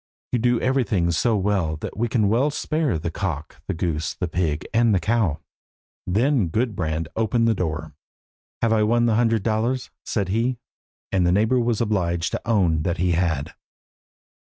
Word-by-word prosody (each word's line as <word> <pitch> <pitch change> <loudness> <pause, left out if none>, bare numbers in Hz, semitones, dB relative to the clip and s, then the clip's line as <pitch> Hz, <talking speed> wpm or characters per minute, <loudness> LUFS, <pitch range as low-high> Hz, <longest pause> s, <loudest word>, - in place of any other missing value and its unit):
You 125 - +1
do 120 0 +2
everything 115 -10 +1
so 95 +8 +2
well 95 -5 0
that - - -6
we 120 +3 0
can 115 -3 +1
well 120 +8 +2
spare 150 - -1
the 85 +2 -3
cock, 80 -5 -4
the - - -2
goose, 80 -1 -2
the 90 - -2
pig, 80 -3 -1
and 115 -2 +4
the - - +3
cow." 95 -4 +1 0.7
Then 115 +3 +2
Gudbrand 80 -6 -1
opened 115 +1 +1
the 115 - +4
door. 80 -6 -3 0.7
"Have 115 -1 +3
I 110 - +3
won 120 +2 +3
the 115 - +2
hundred 115 -2 +2
dollars?" 115 +4 -1
said 100 -4 -2
he, 120 +5 0 0.5
and 95 -2 +2
the 85 - +3
neighbour 110 +7 +3
was 120 -2 0
obliged 90 -6 0
to - - -3
own 90 -8 +2
that 85 +2 -1
he 90 +1 +1
had. 80 -4 0
105 Hz, 175 wpm, -23 LUFS, 85-115 Hz, 0.7 s, and